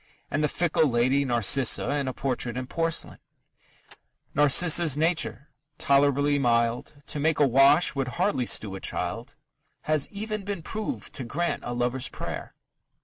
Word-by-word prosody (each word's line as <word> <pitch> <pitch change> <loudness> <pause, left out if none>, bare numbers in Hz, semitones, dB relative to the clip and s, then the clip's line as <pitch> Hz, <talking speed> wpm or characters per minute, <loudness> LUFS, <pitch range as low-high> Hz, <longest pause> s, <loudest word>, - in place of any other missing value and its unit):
And 145 +2 -1
the - - +3
fickle 160 0 +1
lady, 130 +3 +1
Narcissa, 120 +2 +3
is 140 -2 -1
a - - -1
portrait 125 -2 -3
in 130 - -4
porcelain: 165 +4 -2 1.1
Narcissa's 150 +1 +4
nature, 160 -2 -1 0.3
tolerably 145 +1 +2
mild, 120 +3 -1
To 150 - -5
make 155 +1 +1
a 145 - +4
wash, 140 +5 +4
would 135 -3 -2
hardly 130 - 0
stew 105 -3 +1
a 95 - -6
child; 110 +9 -5 0.5
Has 155 -2 0
even 215 0 -5
been 200 -4 -5
proved 220 - -5
to 135 - -4
grant 170 +9 -3
a 120 - -5
lover's 125 +1 -1
prayer. - - -7
140 Hz, 145 wpm, -26 LUFS, 125-160 Hz, 1.1 s, Narcissa's